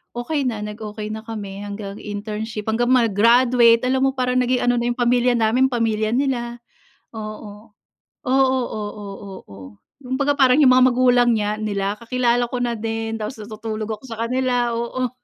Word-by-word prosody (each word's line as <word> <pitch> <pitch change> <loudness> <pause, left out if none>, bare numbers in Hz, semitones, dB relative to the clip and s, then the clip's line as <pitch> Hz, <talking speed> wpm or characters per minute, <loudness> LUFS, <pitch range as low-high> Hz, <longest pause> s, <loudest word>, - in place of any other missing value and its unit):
okey 275 +3 -2
na, 220 -4 -3
nag-okey 210 0 -6
na 220 0 -5
kami 200 -3 -6
hanggang 205 0 -7
internship, 210 +1 -5
hanggang 240 +2 0
mag-graduate. 235 +1 +4
Alam 265 +1 +2
mo, - - -2
parang 255 0 0
naging 250 0 +1
ano 245 -1 +2
na 240 - -1
yung 240 - -1
pamilya 245 0 +2
namin, 235 +3 +3
pamilya 220 -3 0
nila, 240 -3 -1 0.5
oo. 215 0 -9 0.6
Oo, 265 0 +3
oo, 210 -1 -6 0.3
oo, 100 - -15 0.5
kumbaga 275 +3 0
parang 260 0 +5
yung 260 - +7
mga 255 0 +6
magulang 245 -1 +3
niya 210 0 -1
nila, 205 -1 -2
kakilala 240 0 +1
ko 250 - -3
na 240 -1 -1
din, 225 0 -3
tapos 215 +2 -6
natutulog 215 0 -6
ako 265 - -23
sa 225 -3 -8
kanila, 245 0 0
oo. 240 +1 -2
235 Hz, 160 wpm, -21 LUFS, 215-250 Hz, 0.6 s, yung